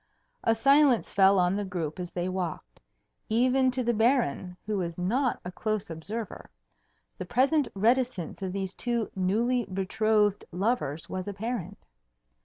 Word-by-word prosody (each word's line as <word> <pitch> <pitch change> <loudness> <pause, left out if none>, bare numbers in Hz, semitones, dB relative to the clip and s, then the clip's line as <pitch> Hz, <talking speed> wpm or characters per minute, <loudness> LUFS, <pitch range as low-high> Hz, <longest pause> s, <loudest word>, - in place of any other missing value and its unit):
A 225 - +3
silence 275 0 +4
fell 195 0 +5
on 180 +1 +3
the 205 - -1
group 175 -4 -4
as 175 -1 -5
they 175 0 -2
walked. 185 -2 -4 0.5
Even 255 +3 +3
to 255 0 -1
the 240 0 +1
Baron, 220 - +1
who 210 -1 -1
was 170 -2 -3
not 240 +9 0
a 180 - -4
close 215 -2 -3
observer, 205 +8 -6 0.7
the - - -4
present 270 +3 +2
reticence 225 -4 0
of 190 -1 -3
these 190 -1 -3
two 235 -2 -2
newly 225 +7 +1
betrothed 205 +2 +1
lovers 180 - -1
was 185 +1 -5
apparent. 205 -1 -5
205 Hz, 145 wpm, -28 LUFS, 185-240 Hz, 0.7 s, fell